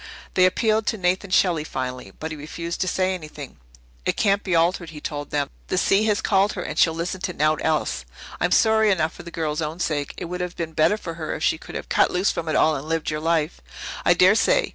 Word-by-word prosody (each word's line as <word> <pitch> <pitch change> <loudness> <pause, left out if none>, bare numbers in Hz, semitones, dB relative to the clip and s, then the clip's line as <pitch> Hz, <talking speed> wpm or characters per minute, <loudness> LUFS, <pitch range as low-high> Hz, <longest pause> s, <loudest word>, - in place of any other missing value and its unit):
They 185 0 +5
appealed 215 +3 +1
to 220 - 0
Nathan 185 +1 0
Shelley 175 -4 +3
finally, 125 -7 -5
but 160 +1 -4
he - - -4
refused 170 +3 -5
to 185 - +1
say 185 0 +1
anything. 150 - -8 0.5
"It - - -1
can't 200 -1 +2
be 185 -3 0
altered," 170 +1 +2
he 155 -1 -9
told 145 -1 -5
them. 145 -1 -1 0.2
"The - - -1
sea 195 +3 +3
has 210 -2 +1
called 195 0 +3
her 180 - -4
and 155 - -4
she'll 160 -1 +4
listen 175 +3 -3
to 185 -1 -2
naught 155 0 +1
else. 110 - 0 0.4
I'm - - +1
sorry 220 -1 +4
enough 160 -5 +1
for - - -10
the 170 - -9
girl's 155 -2 -2
own 155 +2 -4
sake. 145 -5 -2
It - - -5
would 180 +1 -4
have 180 0 -4
been 165 -1 -4
better 160 +7 +3
for 170 -5 -6
her 155 - -2
if 155 - -5
she 160 - +2
could - - -11
have - - -5
cut - - +3
loose 180 +2 +1
from 165 -1 -4
it 155 - 0
all 155 0 +4
and 145 +3 -6
lived 165 -1 -1
your 150 - -2
life, 160 0 0 0.4
I 175 - +5
dare 185 +3 +6
say. - - +2
170 Hz, 250 wpm, -23 LUFS, 155-185 Hz, 0.5 s, dare